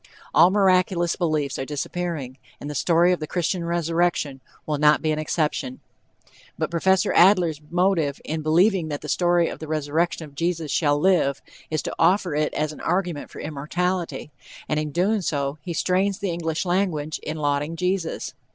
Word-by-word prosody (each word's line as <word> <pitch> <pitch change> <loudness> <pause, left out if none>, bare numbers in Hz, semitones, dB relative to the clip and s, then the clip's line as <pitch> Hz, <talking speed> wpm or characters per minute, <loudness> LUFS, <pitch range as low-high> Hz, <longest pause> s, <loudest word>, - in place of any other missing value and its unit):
All 175 - +7
miraculous 185 -3 +2
beliefs 155 -5 -1
are - - -1
disappearing, 145 -2 -4 0.2
and - - -7
the 150 - -4
story 170 +4 +3
of 180 - 0
the 155 - -5
Christian 175 +1 -1
resurrection 170 -4 0 0.2
will 150 -2 -2
not 150 +1 +4
be 155 - +1
an 155 - -1
exception. 150 -4 -2 0.8
But - - -2
Prof. 190 +3 +2
Adler's 175 -5 +4
motive 175 -5 +1
in 155 +1 -3
believing 175 +3 +3
that 145 -2 -4
the - - -8
story 175 -1 +2
of - - -6
the 155 - -7
resurrection 155 +2 -1
of 145 - -15
Jesus 165 0 -2
shall 145 -3 +2
live, 155 -6 +2 0.3
is 155 -1 -1
to - - -4
offer 185 -3 +3
it 150 0 0
as 155 0 -1
an - - -12
argument 175 -4 -1
for - - -9
immortality, 165 +3 -3 0.4
and 150 - 0
in 155 0 -2 0.3
so 140 -5 -1
doing 145 - -15
he 175 - -3
strains 185 +4 +1
the 200 -3 -2
English 165 0 -2
language 175 -5 -1
in 155 +1 -5
lauding 145 +1 -1
Jesus. 180 -1 -2
165 Hz, 175 wpm, -23 LUFS, 150-180 Hz, 0.8 s, All